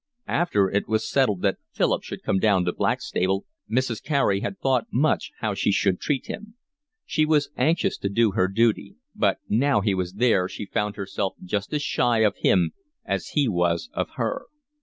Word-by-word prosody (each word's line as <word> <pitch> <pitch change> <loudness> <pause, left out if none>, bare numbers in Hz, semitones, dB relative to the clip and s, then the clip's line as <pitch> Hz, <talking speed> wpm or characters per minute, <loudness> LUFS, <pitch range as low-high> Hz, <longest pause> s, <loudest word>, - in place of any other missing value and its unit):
After 105 - +2
it 100 +2 -1
was 110 0 0
settled 105 -9 +1
that 100 -2 +1
Philip - - +1
should - - -8
come 95 - +1
down 95 -3 +3
to 90 - 0
Blackstable, 95 +2 0 0.2
Mrs. 120 -1 0
Carey 140 -10 +1
had 190 - -4
thought 130 -6 +1
much 145 +6 +1
how 110 -2 0
she 100 - +1
should 95 -2 +1
treat 135 -4 -1
him; 215 +1 -8 0.5
she 155 - +1
was 150 -2 +2
anxious 165 +3 +1
to 100 - -2
do 110 +1 +3
her 95 -1 +2
duty; 115 +3 +1 0.2
but - - +1
now 135 +3 +3
he 100 0 +1
was 90 -1 -2
there 100 -4 +2
she 105 - -6
found 105 +1 -2
herself 100 -1 -3
just 100 +3 -3
as 150 -1 -1
shy 120 -5 +2
of 105 -2 +2
him 85 -4 +3 0.3
as - - -2
he 145 -3 +4
was 85 -4 0
of - - -2
her. - - -2
105 Hz, 185 wpm, -24 LUFS, 95-130 Hz, 0.5 s, he